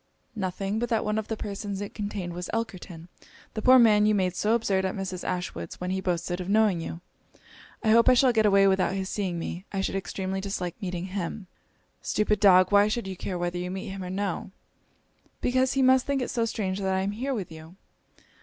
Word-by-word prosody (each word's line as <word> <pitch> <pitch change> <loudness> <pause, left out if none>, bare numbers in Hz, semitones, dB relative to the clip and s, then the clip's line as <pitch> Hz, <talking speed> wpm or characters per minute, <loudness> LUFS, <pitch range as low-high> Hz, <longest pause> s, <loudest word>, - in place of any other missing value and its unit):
'Nothing, 195 +1 -2
but 240 0 -2
that 225 -2 +1
one 215 +1 0
of 215 - -5
the 220 - -3
persons 200 -1 -5
it 205 0 -6
contained 205 -4 -4
was 180 +1 -6
Elkerton, 185 -7 -5 0.5
the 215 - -3
poor 255 +3 +7
man 210 -3 +5
you 215 - +3
made 185 -2 0
so 215 +5 +2
absurd 200 -5 +1
at 190 - -2
Mrs. 185 -2 -4
Ashwood's, 175 - -4
when 180 +1 -3
he 190 0 -1
boasted 175 0 -2
of 180 - -6
knowing 210 -4 +3
you. 165 +1 -6 0.8
I 220 - +2
hope 230 +1 +6
I 255 - +6
shall 250 0 +4
get 220 -2 +3
away 195 -1 +5
without 190 -1 +2
his 190 -1 -3
seeing 190 -4 -2
me 170 +2 -5
I 195 - -1
should - - -2
extremely 190 0 -3
dislike 190 -1 -4
meeting 180 -2 -3
him.' 195 +1 -4 0.6
'Stupid 210 -1 0
dog! 185 -2 +6
why 205 0 +6
should 220 +1 -2
you 190 - -5
care 180 0 -4
whether 175 0 -2
you 180 0 -3
meet 190 +1 -5
him 195 0 -6
or 180 - -6
no?' 190 -1 -3 0.9
'Because 255 +1 +1
he 270 - +2
must 260 0 +4
think 275 -2 0
it - - -4
so 235 -1 0
strange 200 -4 -2
that 190 -1 -1
I 190 - +1
am 195 +1 -1
here 260 +6 -3
with 195 -7 -5
you.' 160 +2 -11
195 Hz, 220 wpm, -27 LUFS, 185-215 Hz, 0.9 s, poor